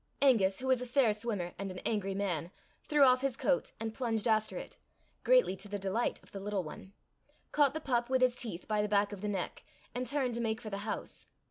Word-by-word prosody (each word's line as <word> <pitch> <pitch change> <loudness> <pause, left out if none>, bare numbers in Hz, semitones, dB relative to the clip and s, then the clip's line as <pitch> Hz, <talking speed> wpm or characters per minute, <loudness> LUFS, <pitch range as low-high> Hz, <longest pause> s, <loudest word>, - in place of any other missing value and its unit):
Angus, 210 -9 +4
who 260 - -6
was 260 -1 +3
a 250 - -4
fair 245 -3 +3
swimmer 210 -5 -3
and 195 0 -3
an 185 - -7
angry 195 -3 0
man, 175 -5 -1 0.4
threw 295 -2 +5
off 255 -1 +6
his 270 -3 -1
coat, 275 -2 +1
and 225 0 -3
plunged 225 -3 -1
after 215 -1 +1
it, - - -8 0.4
greatly - - +5
to 195 +2 -7
the 205 - -2
delight 195 +5 -1
of - - -18
the 200 - -6
little 200 -1 -2
one, 190 +5 -10 0.6
caught 290 -1 +3
the - - -1
pup 245 -4 0
with 260 -1 +3
his 250 -1 +4
teeth 220 -8 -6
by 215 -1 +1
the 210 - -1
back 205 0 +3
of 195 - -7
the 210 - -2
neck, 195 -3 -3 0.3
and 250 +1 -2
turned 265 -2 0
to 235 - -2
make 225 -1 -1
for 220 -3 -7
the 200 - -3
house. - - -5
220 Hz, 235 wpm, -32 LUFS, 200-255 Hz, 0.6 s, off